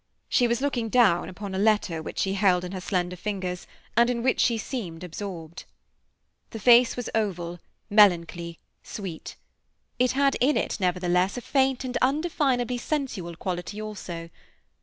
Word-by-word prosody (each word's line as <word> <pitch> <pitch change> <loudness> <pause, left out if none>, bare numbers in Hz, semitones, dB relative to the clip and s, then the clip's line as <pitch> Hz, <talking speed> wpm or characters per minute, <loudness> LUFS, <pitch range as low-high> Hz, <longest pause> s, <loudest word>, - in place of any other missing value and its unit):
She 245 - +3
was 235 +1 0
looking 250 -5 -1
down 215 -8 +3
upon 195 +1 -7
a 190 - -2
letter 205 -6 +2
which - - -8
she 195 - 0
held 190 -3 +3
in 180 - -5
her 190 -1 -5
slender 180 -1 -1
fingers, 185 -2 -4 0.3
and 235 +2 +5
in 235 -1 -1
which 260 - +2
she 235 -2 +3
seemed 200 - -5
absorbed. 170 -2 -7 0.8
The 225 - -7
face 240 +2 +6
was 245 - -3
oval, 175 -5 -2 0.3
melancholy, 170 -5 +3 0.2
sweet. 185 -6 -7 0.6
It 250 0 +3
had 275 0 +2
in 285 +4 +3
it, - - -1
nevertheless, 180 +2 +1
a - - -4
faint 265 0 +1
and 255 -1 -2
undefinably 265 -4 +1
sensual 235 - -3
quality 180 +4 -4
also. 180 -6 -7
205 Hz, 155 wpm, -26 LUFS, 180-245 Hz, 0.8 s, face